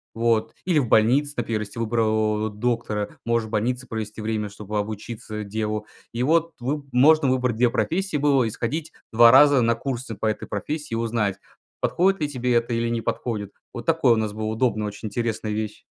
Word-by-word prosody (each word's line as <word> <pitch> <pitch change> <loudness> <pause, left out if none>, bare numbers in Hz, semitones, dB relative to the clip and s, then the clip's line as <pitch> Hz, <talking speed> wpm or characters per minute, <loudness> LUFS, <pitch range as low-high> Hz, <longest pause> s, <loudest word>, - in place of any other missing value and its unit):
Вот. 115 -1 +1
Или 170 -5 +3
в 125 - 0
больнице, 130 +8 +3
например, 115 -2 -1
если 105 +3 -8
выбрал 110 -1 +1
доктора. 105 -1 -2
Можешь 115 -1 +1
в 110 - -13
больнице 125 +4 -1
провести 110 -1 -5
время, 110 -1 -2
чтобы 105 +1 -4
обучиться, 110 +1 -5
э, - - -3
делу. 105 +1 -3 0.3
И 120 +1 -1
вот 165 +3 +2
выб 140 +3 -3
можно 145 +3 +5
выбрать 125 -3 +1
2 125 0 +4
профессии 180 +5 -1
было 140 -3 +3
и - - -1
сходить 150 +8 -3 0.2
2 115 +1 +8
раза 140 0 +7
на 115 0 +2
курсы 120 -2 -4
по 110 - -4
этой 110 - -2
профессии, 150 +6 -4
и - - +1
узнать, 115 -4 -1 0.4
подходит 190 0 +2
ли 150 - 0
тебе 125 -2 -1
это, 120 0 +1
или 115 0 0
не 115 -1 -1
подходит. 105 -5 -3 0.2
Вот 120 -2 -7
такое 160 -7 +4
у - - +2
нас 110 -2 -1
была 110 0 -4
удобно, 110 -1 0
очень 105 +2 -6
интересная 110 -1 -2
вещь. 105 0 -4
115 Hz, 195 wpm, -24 LUFS, 110-130 Hz, 0.4 s, 2